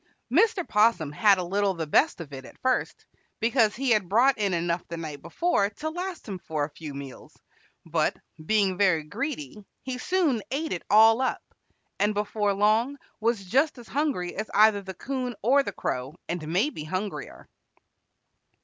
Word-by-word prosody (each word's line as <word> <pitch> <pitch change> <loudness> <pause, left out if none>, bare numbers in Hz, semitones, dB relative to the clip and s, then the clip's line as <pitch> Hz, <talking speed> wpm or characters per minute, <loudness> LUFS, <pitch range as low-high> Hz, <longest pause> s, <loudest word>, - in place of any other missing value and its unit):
Mr. 440 -6 +3
'Possum 210 -8 +3
had 200 +6 +4
a 180 - -2
little 195 +2 0
the 165 -1 -3
best 220 - +2
of 145 -3 -10
it 135 -1 -7
at - - -14
first, 255 0 -1 0.3
because 225 -1 +2
he 265 0 0
had 210 -6 +2
brought 250 +6 +4
in 200 -2 +1
enough 170 0 -1
the 170 - -6
night 155 -4 -6
before 335 - +1
to 310 +9 -5
last 360 -1 -5
him 195 -3 -5
for 155 -3 -3
a 145 - -4
few 150 -1 -8
meals, 140 -2 -10 0.5
but, - - 0 0.3
being 195 0 +1
very 180 -6 +3
greedy, 210 - -5 0.2
he 255 -1 -4
soon 320 - +1
ate 310 +4 -2
it 175 - -4
all 225 +3 +6
up, 260 - -1 0.6
and 210 +1 +2
before 210 0 0
long 220 +7 +2 0.2
was 225 -3 0
just 275 - +2
as 240 -2 -12
hungry 270 - -1
as 215 +1 -4
either 215 -1 +5
the 190 -1 -8
'Coon 255 -3 -4
or 270 +5 +5
the - - -4
Crow, 130 +4 -4
and 170 -3 -4
maybe 185 - 0
hungrier. 185 +5 -5
210 Hz, 175 wpm, -26 LUFS, 175-255 Hz, 0.6 s, all